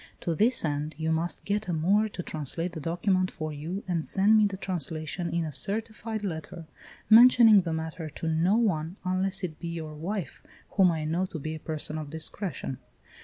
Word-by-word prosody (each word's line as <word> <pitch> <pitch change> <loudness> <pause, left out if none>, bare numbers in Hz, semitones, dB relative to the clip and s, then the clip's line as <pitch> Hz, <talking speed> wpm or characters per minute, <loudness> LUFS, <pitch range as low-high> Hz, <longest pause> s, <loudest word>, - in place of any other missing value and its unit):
To 170 - -1
this 220 +4 +2
end 150 0 -2
you 160 0 -1
must 165 +2 -2
get 205 0 -1
a 175 - -1
Moor 200 +7 +2
to 180 -3 -6
translate 165 +3 -3
the 165 - -6
document 185 +4 +1
for 155 -1 -5
you 165 +7 -5
and 170 -3 -1
send 200 +3 +4
me 215 -1 +5
the 195 -1 -5
translation 170 -1 -3
in 170 -1 -1
a 155 - -4
certified 215 - -2
letter, 165 -2 -5 0.4
mentioning 225 -2 +8
the 170 -2 -4
matter 160 0 -4
to 160 +2 -6
no 165 +5 +2
one, 175 -7 0
unless 190 +1 0
it 160 -4 -4
be 170 - -5
your 160 -2 -5
wife, 170 +1 -5 0.3
whom 190 -3 +5
I 160 -2 -2
know 170 +4 0
to 170 - -6
be 155 +1 -4
a 160 - -6
person 155 0 -4
of 150 -2 -6
discretion. 160 - -4
170 Hz, 195 wpm, -28 LUFS, 155-195 Hz, 0.4 s, mentioning